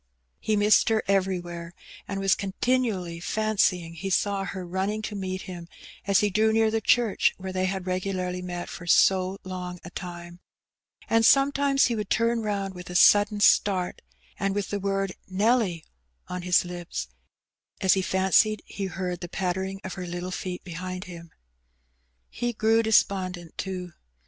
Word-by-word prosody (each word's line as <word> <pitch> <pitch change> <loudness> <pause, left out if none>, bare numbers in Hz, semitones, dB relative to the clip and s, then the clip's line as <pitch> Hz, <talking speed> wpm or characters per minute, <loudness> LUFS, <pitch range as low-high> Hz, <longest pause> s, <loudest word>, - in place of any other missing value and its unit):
He 215 - 0
missed 210 +2 +4
her 220 -1 +2
everywhere^ 175 -3 -1 0.3
and 200 -1 -3
was 195 0 +3
continually 200 -4 -1
fancying 185 -4 0
he 170 +4 -5
saw 195 +1 +1
her 190 -2 -5
mnning 190 +4 -2
to 210 - -4
meet 190 -1 -4
him 175 -2 -8 0.4
as 200 -1 +4
he 210 -1 +1
drew 220 +3 +3
near 220 0 +3
the 225 0 0
church 230 -1 +3
where 190 0 -6
they 185 0 0
had 190 0 -3
regularly 185 -1 -2
met 175 -1 -5
for 175 - -9
so 185 +2 +4
long 180 -1 -6
a 175 - -9
time; 175 -1 -8 0.7
and 225 0 +3
some 275 +4 +6
times 280 -1 +3
he 240 - 0
would 210 -2 -4
turn 230 0 +1
round 200 -3 -2
with 180 -1 -10
a 180 - -7
sudden 205 +3 +5
starts 190 -3 +3 0.4
and 195 0 0
with 205 -1 -2
the 205 - -1
word 195 -1 -1
"Nelly" 195 -3 +1 0.4
on 180 0 -5
his 180 +1 +3
lips, 175 - -5 0.7
as 190 -1 +4
he 190 - +1
fancied 190 +3 +2
he 200 - -5
heard 180 -1 -4
the 175 - -7
pattering 190 +2 -2
of 190 - -5
her 180 -2 -6
little 175 +1 -5
feet 180 0 -5
behind 185 +1 -6
him. 170 -2 -10 1.0
He 240 - -3
grew 225 +1 +3
despondent, 185 -6 +1
too. 180 -3 -5
190 Hz, 165 wpm, -26 LUFS, 180-210 Hz, 1.0 s, some